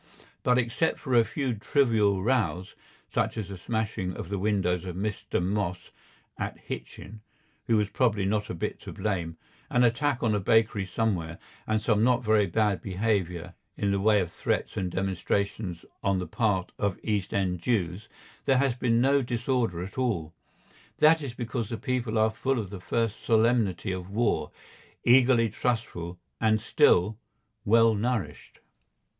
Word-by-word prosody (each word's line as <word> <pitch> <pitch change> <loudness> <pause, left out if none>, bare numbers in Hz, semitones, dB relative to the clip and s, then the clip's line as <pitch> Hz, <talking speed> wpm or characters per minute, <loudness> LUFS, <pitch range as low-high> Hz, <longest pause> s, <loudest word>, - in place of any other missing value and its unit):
But 125 0 +3
except 125 +6 0
for 130 - -4
a 120 -1 +6
few 135 +1 -2
trivial 105 -4 +2
rows, 95 -7 0 0.4
such - - 0
as 105 -3 -4
the 100 - -6
smashing 100 -3 -2
of 85 - -6
the 100 -1 -2
windows 95 -4 0
of 90 -2 -6
Mr. 100 +2 -2
Moss, 90 -1 -2 0.5
at - - -3
Hitchin, 105 +1 -8 0.5
who 115 - +3
was 105 -1 +2
probably 110 -6 +1
not 105 +1 0
a - - -3
bit 80 - -3
to - - -9
blame, 85 -6 -2 0.3
an 125 - +3
attack 125 +3 +1
on 110 -2 +2
a 105 - +1
bakery 105 0 +2
somewhere, 90 -5 -1 0.3
and 110 0 +1
some 105 -1 +2
not 125 0 +3
very 105 -2 +3
bad 105 +2 +1
behaviour 95 -4 -1 0.2
in 100 - 0
the 100 - +1
way 105 +1 +4
of 85 -2 -4
threats - - -2
and 90 - -1
demonstrations 95 0 -2 0.2
on 100 -1 +1
the 90 - -2
part 100 -5 0
of 100 -3 0
East 105 -4 -1
End 90 -3 0
Jews, 95 -1 -1 0.4
there 135 - +4
has 135 -1 +2
been 120 -1 +1
no 140 +2 +4
disorder 120 - -1
at 95 +7 -7
all. 90 -11 -1 0.6
That 160 +1 +5
is 130 -4 -6
because 120 -2 -3
the 115 - -3
people 125 -3 -2
are 110 0 +3
full 135 +4 -1
of 100 -5 -4
the 100 -3 -7
first 115 +2 -1
solemnity 110 -5 +2
of 90 0 -5
war, 115 +4 0 0.5
eagerly 120 -2 +5
trustful, 100 -7 -3 0.2
and 110 -1 +3
still—well 110 +3 +2
nourished. 110 -1 -3
110 Hz, 160 wpm, -27 LUFS, 95-120 Hz, 0.6 s, a